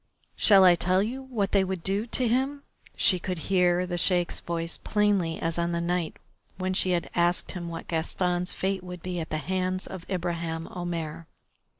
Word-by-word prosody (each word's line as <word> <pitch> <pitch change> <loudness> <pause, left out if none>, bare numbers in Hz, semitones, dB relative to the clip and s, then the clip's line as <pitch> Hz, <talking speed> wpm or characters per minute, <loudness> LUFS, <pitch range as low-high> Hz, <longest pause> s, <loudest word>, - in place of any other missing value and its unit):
"Shall 195 -3 +7
I 180 -1 +8
tell 180 +3 +2
you 250 +5 -4
what 230 -7 -2
they 195 -1 +4
would 190 -2 -3
do 200 +4 0
to 250 +1 0
him?" 270 +4 0 0.3
She 185 - +4
could 180 +1 -3
hear 180 +1 +2
the 175 -1 -2
Sheik's 175 -1 +2
voice 170 0 -3
plainly 200 -6 +1
as 165 +1 -2
on 170 0 0
the 170 - 0
night 170 -1 -1 0.4
when 185 0 -1
she 185 - +2
had 175 -1 0
asked 175 +1 +1
him 175 -2 -6
what 165 0 -7
Gaston's 175 +2 -1
fate 190 -1 -2
would 180 -2 -8
be 180 -1 -3
at 160 - -5
the 155 - -1
hands 185 +3 -2
of 185 - -7
Ibraheim 170 -3 -2
Omair. 165 -4 -4
180 Hz, 190 wpm, -27 LUFS, 170-190 Hz, 0.4 s, I